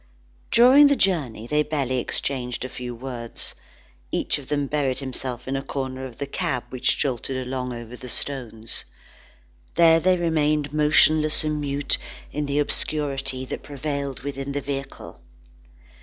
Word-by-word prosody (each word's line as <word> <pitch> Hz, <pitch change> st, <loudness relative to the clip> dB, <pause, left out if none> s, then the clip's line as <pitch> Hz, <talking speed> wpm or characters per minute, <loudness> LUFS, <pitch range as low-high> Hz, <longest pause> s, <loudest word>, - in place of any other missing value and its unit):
During 260 Hz, +5 st, +8 dB
the 285 Hz, -, +4 dB
journey, 145 Hz, -, +1 dB
they 150 Hz, +5 st, +2 dB
barely 140 Hz, -4 st, -1 dB
exchanged 125 Hz, 0 st, -1 dB
a -, -, -5 dB
few 125 Hz, -1 st, -6 dB
words. 120 Hz, -1 st, -3 dB, 0.6 s
Each -, -, +1 dB
of 135 Hz, -, -12 dB
them 145 Hz, -1 st, 0 dB
buried 140 Hz, -2 st, 0 dB
himself 130 Hz, -2 st, -4 dB
in 135 Hz, -, -1 dB
a 135 Hz, -, -1 dB
corner 130 Hz, -1 st, -4 dB
of 120 Hz, -, -13 dB
the 140 Hz, -, -3 dB
cab 130 Hz, -3 st, -2 dB
which 130 Hz, -1 st, +2 dB
jolted 130 Hz, -1 st, -1 dB
along 125 Hz, 0 st, -3 dB
over 120 Hz, 0 st, -7 dB
the 125 Hz, 0 st, -9 dB
stones. 115 Hz, -5 st, -2 dB, 0.9 s
There 165 Hz, -1 st, +6 dB
they 185 Hz, +2 st, +3 dB
remained 150 Hz, -4 st, +1 dB
motionless 155 Hz, 0 st, +4 dB
and 150 Hz, -1 st, -1 dB
mute 140 Hz, 0 st, +1 dB, 0.3 s
in 150 Hz, 0 st, -2 dB
the 140 Hz, +1 st, -1 dB
obscurity 140 Hz, -3 st, 0 dB
that -, -, -5 dB
prevailed 140 Hz, -1 st, -4 dB
within 140 Hz, 0 st, -4 dB
the 145 Hz, -, -1 dB
vehicle. 135 Hz, 0 st, -6 dB
140 Hz, 150 wpm, -24 LUFS, 130-150 Hz, 0.9 s, During